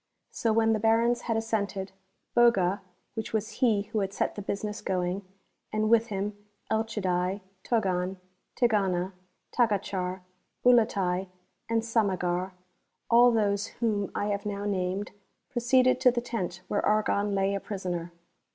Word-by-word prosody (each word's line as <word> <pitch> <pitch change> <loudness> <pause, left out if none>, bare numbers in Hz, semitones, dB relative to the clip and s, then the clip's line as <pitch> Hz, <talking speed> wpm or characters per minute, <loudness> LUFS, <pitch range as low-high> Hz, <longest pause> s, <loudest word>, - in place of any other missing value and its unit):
So 225 - 0
when 225 0 +3
the 215 - 0
Barons 230 +2 +3
had 225 - +2
assented, 205 -4 -2 0.4
Bog.v 200 -5 +4 0.3
(which 220 -1 -5
was 220 +1 -2
he 220 -5 +3
who 215 - -3
had 195 -1 -2
set - - -1
tlic 205 -1 -8
business 210 +1 -3
going), 185 0 -1 0.5
and 215 +1 0
with 230 0 +5
him 205 -1 -3 0.4
Elchid.vi, 195 -4 0 0.2
Toc.an, 190 -5 0 0.4
Tkcjana, 195 -6 +2 0.4
Taoacuak, 195 -5 0 0.4
Ulatai, 195 -6 +3 0.4
and 225 0 +1
Sama(;ak, 185 -5 0 0.3
— - - -50
all 240 +1 +7
those 205 -2 +1
whom 210 -4 +1
1 205 0 0
have 200 0 -2
now 205 -1 -3
named, 190 0 -1 0.2
— - - -49
proceeded 255 +1 +3
to 260 - +7
the 240 0 0
tent 190 -7 -4
where 205 - 0
Argon 210 -1 +2
lay 195 0 +1
a 200 - -1
j)risoner. 180 -4 -4
205 Hz, 140 wpm, -28 LUFS, 190-225 Hz, 0.5 s, all